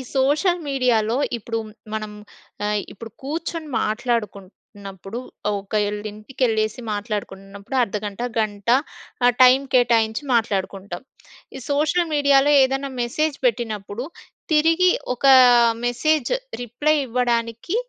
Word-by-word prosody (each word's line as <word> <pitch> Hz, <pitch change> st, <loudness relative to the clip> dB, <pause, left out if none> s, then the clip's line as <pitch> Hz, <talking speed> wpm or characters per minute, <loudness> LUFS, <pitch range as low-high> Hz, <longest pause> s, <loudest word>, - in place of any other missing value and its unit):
Social 300 Hz, +7 st, +2 dB
మీడియాలో 245 Hz, -3 st, +1 dB, 0.2 s
ఇప్పుడు, 230 Hz, +1 st, -4 dB, 0.4 s
మనం 215 Hz, -1 st, -4 dB, 0.5 s
ఆహ్, 210 Hz, 0 st, 0 dB
ఇప్పుడు 225 Hz, +1 st, -10 dB
కూర్చొని 320 Hz, +2 st, -4 dB
మాట్లాడుకుంటున్నప్పుడు, 205 Hz, -2 st, -4 dB, 0.4 s
ఒకళ్లీంటికెళ్ళేసి 215 Hz, +3 st, -2 dB
మాట్లాడుకుంటున్నప్పుడు 200 Hz, 0 st, -6 dB
అర్ధగంట, 210 Hz, 0 st, -5 dB, 0.2 s
గంట 205 Hz, -1 st, -3 dB, 0.6 s
ఆహ్, 245 Hz, -, +5 dB
టైం 255 Hz, +1 st, +7 dB, 0.2 s
కేటాయించి 230 Hz, 0 st, +2 dB
మాట్లాడుకుంటాం. 195 Hz, -3 st, -2 dB, 0.5 s
ఈ -, -, -7 dB
సోషల్ 310 Hz, +4 st, +1 dB
మీడియాలో 285 Hz, 0 st, +4 dB
ఏదన్నా 270 Hz, +1 st, -1 dB
మెసేజ్ 290 Hz, +5 st, -1 dB
పెట్టినప్పుడు, 220 Hz, 0 st, -2 dB, 0.5 s
తిరిగి 330 Hz, +4 st, +4 dB, 0.3 s
ఒకా 270 Hz, +1 st, +6 dB, 0.5 s
మెసేజ్ 275 Hz, +3 st, +1 dB, 0.3 s
రిప్లై 290 Hz, +7 st, 0 dB
ఇవ్వడానికి, 235 Hz, -, -1 dB
235 Hz, 90 wpm, -22 LUFS, 210-270 Hz, 0.6 s, టైం